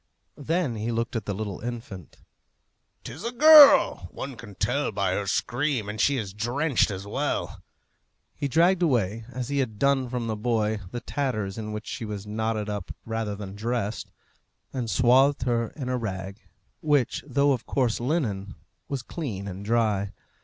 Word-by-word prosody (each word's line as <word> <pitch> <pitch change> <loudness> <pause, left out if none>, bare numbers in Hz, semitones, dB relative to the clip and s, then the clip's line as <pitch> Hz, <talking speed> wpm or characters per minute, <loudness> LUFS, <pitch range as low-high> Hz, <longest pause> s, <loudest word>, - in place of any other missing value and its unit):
Then 155 -5 0
he 110 +2 -2
looked 115 +1 -2
at 110 -4 -2
the 100 - -2
little 100 -2 -4
infant. 115 - -7 0.9
"'Tis - - -8
a 235 - -2
girl! 290 - +8
one 135 +6 -7
can 110 -4 -11
tell 145 +9 0
that - - -2
by 100 -2 +1
her 100 +1 -2
scream, 125 +1 0
and 105 +1 -3
she 140 -1 +3
is 100 -6 -4
drenched 120 +7 +1
as 100 -1 -5
well." 100 - -2 0.7
He 140 - -3
dragged 170 +6 +3
away, 115 - +1
as 125 0 -4
he 140 0 0
had 110 -6 -2
done 135 +1 +2
from 120 -1 -3
the 110 -1 -2
boy, 110 -1 0
the 120 +4 -5
tatters 110 -9 -2
in 110 -1 -5
which 105 +1 -5
she 120 - -5
was 105 -1 -6
knotted 110 0 -2
up 105 -3 -4 0.2
rather 110 -2 -3
than 100 -1 -7
dressed, 115 -1 -3 0.6
and 125 -4 -3
swathed 130 +3 +4
her 120 -2 +1
in 135 -5 -5
a 125 0 0
rag, 95 -1 -5 0.4
which, 145 -6 +1
though 140 +1 +3
of 125 -4 -2
coarse 125 -5 +1
linen, 120 - -2 0.3
was 135 -3 -3
clean 115 - -5
and 95 +1 -6
dry. 105 -3 +1
115 Hz, 175 wpm, -26 LUFS, 105-135 Hz, 0.9 s, girl